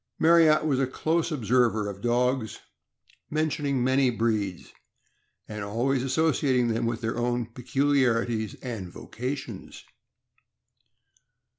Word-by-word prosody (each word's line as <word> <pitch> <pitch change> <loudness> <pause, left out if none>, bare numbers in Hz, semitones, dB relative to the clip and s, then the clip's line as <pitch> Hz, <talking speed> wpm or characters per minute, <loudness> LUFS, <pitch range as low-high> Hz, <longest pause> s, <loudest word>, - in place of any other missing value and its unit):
Marryat 160 -2 +5
was 140 -4 +1
a 135 - +1
close 160 +5 -1
observer 120 -5 +1
of 100 -1 -7
dogs, 120 0 0 0.7
mentioning 150 -4 -1
many 130 +1 +3
breeds, 110 -6 -2 0.7
and 105 -1 -6
always 120 +6 0
associating 130 -2 +1
them 115 +1 0
with 115 0 -3
their 115 0 -2
own 120 0 0
pecul 130 +5 -1
iarities 115 -5 +1
and 110 -8 -5
vocations. 125 +1 -7
125 Hz, 110 wpm, -26 LUFS, 115-140 Hz, 0.7 s, Marryat